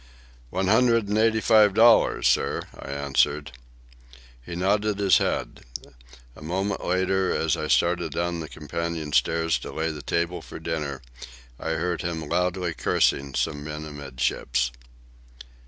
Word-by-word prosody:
"One 95 +7 -1
hundred 115 +1 +3
and 105 - +1
eighty 110 0 +3
five 105 -3 +5
dollars, 115 +1 +5
sir," - - +1
I - - -10
answered. 70 +1 0 0.9
He 85 - -7
nodded 100 +3 +1
his 100 -2 +4
head. - - -2 0.7
A - - -14
moment 95 +6 -2
later, 95 +1 +1
as 80 -3 +1
I - - -3
started - - +2
down 85 0 -2
the 80 -1 -6
companion 80 -1 -4
stairs 80 -4 +2
to - - -8
lay 80 +1 -2
the 75 -2 -7
table 85 +5 -1
for - - -10
dinner, 75 -5 -4 0.6
I 80 - -2
heard 80 +1 -2
him 80 -3 -4
loudly 90 +1 0
cursing 70 -2 +1
some 75 0 -1
men 75 0 -6
amidships. 65 -3 -2
85 Hz, 140 wpm, -25 LUFS, 75-95 Hz, 0.9 s, five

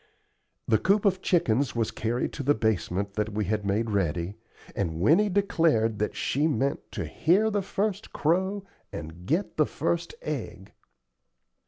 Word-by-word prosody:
The 110 -2 +3
coop 200 - +2
of 190 -2 +2
chickens 140 -9 +1
was 115 -2 0
carried 120 +3 -2
to - - -5
the 145 +2 +3
basement 100 -2 -1
that 105 +1 -1
we 105 0 -1
had 105 +2 -1
made 105 +3 0
ready, 90 -2 0 0.4
and 80 -5 -2
Winnie 170 - +4
declared 165 - +2
that 105 - -1
she 145 +4 +1
meant 140 -1 -1
to - - -3
"hear 205 +7 +2
the 205 -1 +1
first 200 +2 -2
crow 190 +5 0 0.3
and 80 +4 -8
get 175 - 0
the 155 - +3
first 170 +3 -2
egg." 125 -10 -5
125 Hz, 155 wpm, -27 LUFS, -, 0.4 s, Winnie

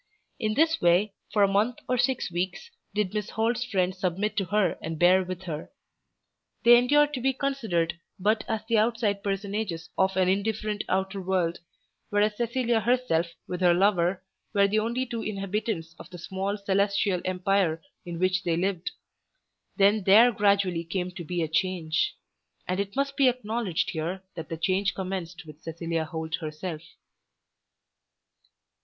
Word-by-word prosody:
In 215 -3 0
this 325 +1 +3
way, 180 +4 +3 0.2
for 205 -1 +3
a - - +6
month 210 +5 +1
or 255 - +1
six 250 -5 +1
weeks, 185 - -3 0.2
did 210 -3 0
Miss 210 -2 -2
Holt's 230 +2 0
friends 185 -5 -1
submit 195 +4 -1
to 195 - +1
her 205 +1 +1
and 160 0 -4
bear 180 +3 +5
with 185 0 -6
her. 160 -4 -5 0.9
They 240 +1 +9
endured 290 +5 +4
to 255 - -3
be 265 +2 +2
considered 225 -12 -1 0.2
but 215 +3 +1
as 220 -1 -2
the 225 -1 +2
outside 220 -3 +1
personages 195 -4 -3
of 190 0 +2
an 185 -1 +3
indifferent 210 +2 0
outer 190 +1 -1
world, 180 -2 0 0.5
whereas 210 +1 +2
Cecilia 235 0 +1
herself 220 -8 +1 0.2
with 180 0 -4
her 175 -1 +5
lover 185 -1 +2 0.3
were 200 0 +5
the 215 +2 +2
only 235 +4 -1
two 235 -2 -4
inhabitants 195 -4 -3
of - - -11
the 180 - -9
small 190 +4 -3
celestial 200 -2 +1
empire 185 -2 +1 0.2
in 170 -1 -6
which 185 +2 +1
they 165 -1 0
lived. 185 -1 -1 0.9
Then 205 +1 +4
there 225 +5 +7
gradually 200 -5 +2
came 180 +2 -3
to 180 -1 -7
be 175 +1 -2
a - - -1
change. 165 -1 0 0.5
And 185 +1 -1
it 200 0 -3
must 275 0 0
be 275 -2 +4
acknowledged 225 -6 -2
here 175 +3 -3
that 165 -2 -7
the 165 - -4
change 190 +4 +1
commenced 185 -2 -5
with 155 0 -13
Cecilia 165 0 -3
Holt 160 0 -4
herself. 155 0 -5
195 Hz, 160 wpm, -27 LUFS, 175-215 Hz, 0.9 s, They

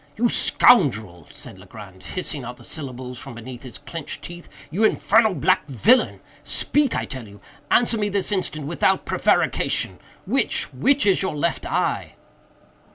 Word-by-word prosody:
"You 240 +2 +2
scoundrel," 110 - +3
said 95 - -10
Legrand, 95 -1 -13
hissing 155 -6 -5
out 120 +1 -8
the - - -16
syllables 130 -4 -7
from 130 -2 -9
between 120 +1 -9
his 125 -2 -8
clenched 165 -3 -7
teeth—"you 175 +1 -6
infernal 220 -1 +3
black 185 -3 +1
villain!—speak, 250 - +1
I - - -2
tell 130 -5 -8
you!—answer 215 - -1
me 205 -1 0
this 200 +1 0
instant, 155 -7 -1
without 170 +5 +1
prevarication!—which—which 280 -2 0
is 195 -2 +3
your 190 -5 -2
left 165 +3 -1
eye?" - - -1
155 Hz, 130 wpm, -22 LUFS, 125-205 Hz, -, scoundrel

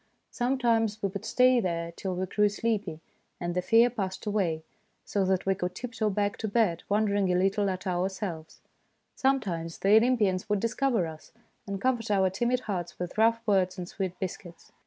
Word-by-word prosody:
Sometimes 235 -4 +1
we 200 - +1
would 195 0 -6
stay 255 0 +4
there 170 -4 -2
till 185 +2 -4
we 185 +1 -1
grew 210 +3 +2
sleepy, 210 -6 -2 0.4
and 175 0 -2
the 180 - 0
fear 230 +5 +5
passed 200 -6 -4
away, 185 -7 0 0.4
so 200 - 0
that 190 0 +1
we 195 - +3
could 180 -1 -4
tiptoe 230 -2 -2
back 205 0 -1
to 220 - -3
bed, 205 -6 +1
wondering 205 -2 +2
a - - +2
little 195 +2 +2
at 185 -1 -4
ourselves; 180 -2 -3 0.5
sometimes 185 -12 -1
the 200 +2 +5
Olympians 215 -5 +2
would 205 -1 +2
discover 230 -2 +1
us, 160 -1 -10 0.4
and 200 -1 -3
comfort 240 -1 0
our 190 -2 +3
timid 240 +6 0
hearts 180 -6 -4
with 180 0 -5
rough 230 +1 +4
words 190 -3 +2
and 180 -1 -5
sweet 185 -1 -4
biscuits. 175 -2 -7
200 Hz, 180 wpm, -28 LUFS, 180-225 Hz, 0.5 s, fear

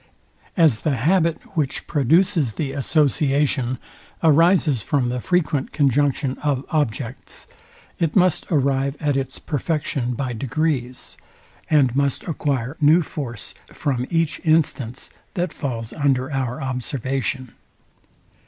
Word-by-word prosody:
As 155 -10 +4
the 150 -3 +1
habit, 165 +5 +2 0.2
which 150 -5 -1
produces 160 - +2
the 140 +2 -3
association, 140 -2 +1 0.5
arises 165 - +4
from 125 +2 0
the 125 0 -2
frequent 160 -5 0
conjunction 140 -1 +1
of 140 -3 -1
objects, 130 -4 -3 0.5
it 165 -3 0
must 185 -4 +3
arrive 140 -2 +1
at 145 -2 0
its 135 0 -2
perfection 145 -4 -2
by 130 0 -3
degrees, 130 0 -2 0.5
and 135 -5 +3
must 140 -1 0
acquire 140 -5 -2
new 155 +4 +5
force 125 -8 -5
from 130 -3 -2
each 165 -2 0
instance, 150 -7 0 0.2
that 180 -1 -1
falls 115 -6 -4
under 135 -2 +1
our 130 -2 -2
observation. 130 0 -3
140 Hz, 115 wpm, -22 LUFS, 130-155 Hz, 0.5 s, new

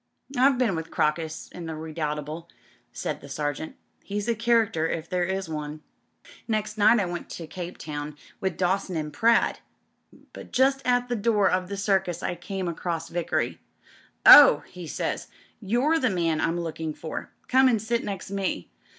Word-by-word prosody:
"I've 260 +1 +4
been 235 -7 +1
with 160 0 -5
Crocus 155 +1 -1
— - - -20
^in 170 -2 -6
the 160 - -4
Redoubtable,'* 155 +1 -4 0.4
sdid - - -4
the 140 - -12
Sergeant. 145 +2 -3 0.3
"He's 205 +1 -4
a 235 - +3
character 225 -8 +2
if 165 0 -3
there 180 0 0
is 190 0 -2
one." 150 -1 -5 0.6
"Next 215 -2 -1
night 215 +2 +5
I 200 - +1
went 175 0 -5
into 165 - -8
Cape 175 +2 -7
Town 150 -1 -6 0.2
with 190 -3 -2
Dawson 190 0 0
and 150 -2 -3
Pratt; 230 +9 +3 0.7
but - - -10
just 270 +1 +3
at 245 0 +2
the 245 - -1
door 210 -2 +2
of 185 0 0
the 200 - -4
Circus 190 -3 0
I - - -1
came 185 +2 -5
across 165 -1 -3
Vickery. 170 -1 -2 0.3
* - - -30
Ohl' 270 - +10
he 180 -2 -10
says, - - -3 0.2
* - - -35
you're 290 +8 +3
the 255 - +2
man 165 -5 0
I'm 165 +1 0
looking 160 -2 -4
for. 160 - -6 0.2
Come 260 +1 +5
and 235 -4 +3
sit 230 +2 -1
next 195 -1 -5
me. 195 - -3
180 Hz, 180 wpm, -26 LUFS, 160-220 Hz, 0.7 s, Ohl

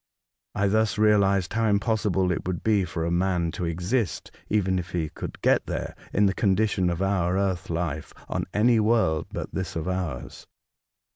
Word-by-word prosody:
I 100 - +1
thus 110 +2 +1
realised 100 -3 +3
how 115 0 +1
impossible 100 -3 +1
it 90 - -3
would 90 -2 -3
be 105 -4 +3
for 80 -1 -3
a 85 - -1
man 85 -1 +1
to 90 - -4
exist, 90 +6 -2 0.2
even 95 -3 +1
if 90 0 -6
he 80 -3 -1
could - - -7
get - - +3
there, - - -3 0.2
in 105 - +3
the 95 - +2
con 100 -3 +2
dition 95 -4 +1
of 85 +3 -2
our 95 -2 +1
earth 95 -3 -1
life, 85 -3 -3 0.2
on - - -2
any 115 +2 +3
world 110 -8 +2
but - - -5
this 95 -3 -3
of 80 0 -3
ours. 90 -9 -4
95 Hz, 185 wpm, -26 LUFS, 85-105 Hz, 0.2 s, realised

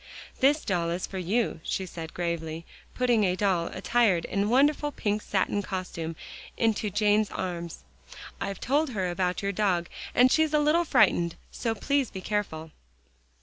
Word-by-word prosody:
"This 290 +3 +3
doll 175 -4 0
is 175 +2 -2
for 190 - -6
you," 205 +3 0
she 190 - -2
said 165 -2 -8
gravely, 165 -2 -3 0.3
putting 245 -4 +2
a 180 -2 +2
doll 185 -4 +1
attired 185 -2 +1
in 200 +1 0
a - - 0
wonderful 290 +5 +3
pink 210 -5 -1
satin 205 0 0
costume 180 -4 -5 0.4
into 220 -2 +1
Jane's 210 +1 +2
arms. 170 -2 -5 0.6
"I've 195 -1 -3
told 290 +4 +1
her 190 -7 -2
about 180 +2 -1
your 200 - 0
dog, 185 -4 0 0.3
and 255 +1 +6
she's 315 -1 +3
a - - +5
little 310 +4 +3
frightened, 175 - +3 0.2
so 225 -2 -2
please 280 +3 0
be 190 - -7
careful." 170 -6 -3
200 Hz, 160 wpm, -27 LUFS, 175-240 Hz, 0.6 s, and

